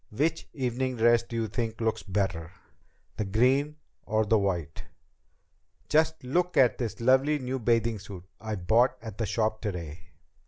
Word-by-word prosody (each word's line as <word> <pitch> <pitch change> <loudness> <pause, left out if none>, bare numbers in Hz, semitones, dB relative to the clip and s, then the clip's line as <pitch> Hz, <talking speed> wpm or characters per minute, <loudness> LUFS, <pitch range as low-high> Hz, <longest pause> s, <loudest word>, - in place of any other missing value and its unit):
Which 155 +9 -1
evening 130 -1 -2
dress 120 0 +4
do 120 0 -9
you 115 -1 0
think 110 +1 -3
looks 110 -1 0
better? 95 -4 -2 0.7
The - - 0
green 130 +9 +2 0.3
or 110 0 0
the 110 +1 +3
white?" 85 -6 -2 1.0
"Just 160 -1 +2
look 175 +8 0
at 130 -3 +4
this 115 -6 -3
lovely 130 +5 +3
new 130 -1 -3
bathing 115 -1 +1
suit 95 -2 -10 0.2
I 110 -1 -4
bought 115 +7 +2
at 110 -2 -8
the 110 - 0
shop 110 +1 -1
today!" 85 -7 -5
115 Hz, 155 wpm, -28 LUFS, 105-130 Hz, 1.0 s, dress